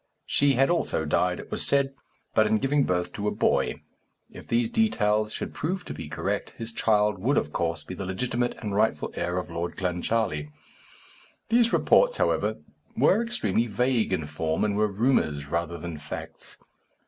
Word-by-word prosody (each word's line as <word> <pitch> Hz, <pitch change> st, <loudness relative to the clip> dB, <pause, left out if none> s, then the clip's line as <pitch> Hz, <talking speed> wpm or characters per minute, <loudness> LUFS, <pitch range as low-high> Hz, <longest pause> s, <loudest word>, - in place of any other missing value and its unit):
She 140 Hz, -1 st, +3 dB
had 135 Hz, +5 st, +3 dB
also 165 Hz, -, 0 dB
died, 90 Hz, +4 st, +1 dB
it -, -, -10 dB
was -, -, 0 dB
said, 140 Hz, -1 st, +2 dB, 0.4 s
but 110 Hz, -, +4 dB
in 110 Hz, 0 st, +3 dB
giving 135 Hz, +4 st, +2 dB
birth 90 Hz, -1 st, -1 dB
to 105 Hz, 0 st, -3 dB
a -, -, +2 dB
boy. -, -, 0 dB, 0.5 s
If -, -, -12 dB
these 115 Hz, -1 st, +1 dB
details 110 Hz, -, +2 dB
should -, -, -5 dB
prove 180 Hz, +4 st, -3 dB
to -, -, -5 dB
be 80 Hz, -, -7 dB
correct, -, -, -3 dB
his 115 Hz, 0 st, -4 dB
child 105 Hz, -3 st, +2 dB
would 130 Hz, +9 st, +1 dB
of 75 Hz, -, -1 dB
course 85 Hz, -1 st, -1 dB
be -, -, -8 dB
the 95 Hz, +1 st, -5 dB
legitimate 120 Hz, +5 st, -1 dB
and 105 Hz, -2 st, -3 dB
rightful 110 Hz, +2 st, +1 dB
heir 90 Hz, +1 st, -2 dB
of 90 Hz, -1 st, -4 dB
Lord 85 Hz, +1 st, -4 dB
Clancharlie. 90 Hz, -3 st, -1 dB, 1.0 s
These 235 Hz, 0 st, +4 dB
reports, -, -, +4 dB
however, -, -, +1 dB, 0.4 s
were 225 Hz, -, +4 dB
extremely 235 Hz, -, 0 dB
vague 120 Hz, +1 st, +1 dB
in 80 Hz, -5 st, 0 dB
form, 80 Hz, +2 st, -2 dB
and 105 Hz, -1 st, +1 dB
were 105 Hz, +1 st, +3 dB
rumours 100 Hz, -, +1 dB
rather 85 Hz, +1 st, -2 dB
than 85 Hz, -2 st, -6 dB
facts. 75 Hz, +1 st, -8 dB
105 Hz, 175 wpm, -26 LUFS, 85-125 Hz, 1.0 s, but